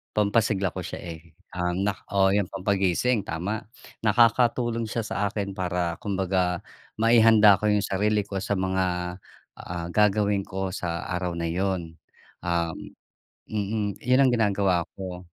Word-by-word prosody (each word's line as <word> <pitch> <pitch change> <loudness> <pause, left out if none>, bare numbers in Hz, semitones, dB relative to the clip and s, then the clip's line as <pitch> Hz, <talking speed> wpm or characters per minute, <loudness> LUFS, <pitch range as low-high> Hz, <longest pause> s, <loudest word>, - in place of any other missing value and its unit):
pampasigla 105 -2 +1
ko - - -6
siya, - - -6 0.2
eh, 80 -1 -23 0.2
um, 90 +2 0
nak 100 -2 -3
oo 95 0 +3
yung 100 -2 +1
pampagising, 100 +4 +1
tama. 95 +8 -3 0.3
Nakakatulong 115 +1 +2
siya 115 +1 -2
sa 105 -1 -1
akin 100 -1 -3
para 90 -2 -2
kumbaga, 95 -3 -1 0.3
maihanda 110 -3 +6
ko 105 - 0
yung 105 -1 +2
sarili 105 +2 +1
ko 100 -1 -4
sa 100 - -1
mga, 95 0 0 0.7
ah, 85 -1 -5
gagawin 105 -1 +2
ko 95 0 -3
sa 85 -2 -3
araw 90 -1 -2
na 85 -1 -2
yun, 90 -3 -2 0.4
um 85 -1 -1 0.7
mm, 105 -1 -3
yun 125 +2 +3
ang 135 -2 +5
ginagawa 100 -5 +2 0.2
ko. 90 -1 -6
100 Hz, 140 wpm, -25 LUFS, 90-105 Hz, 0.7 s, maihanda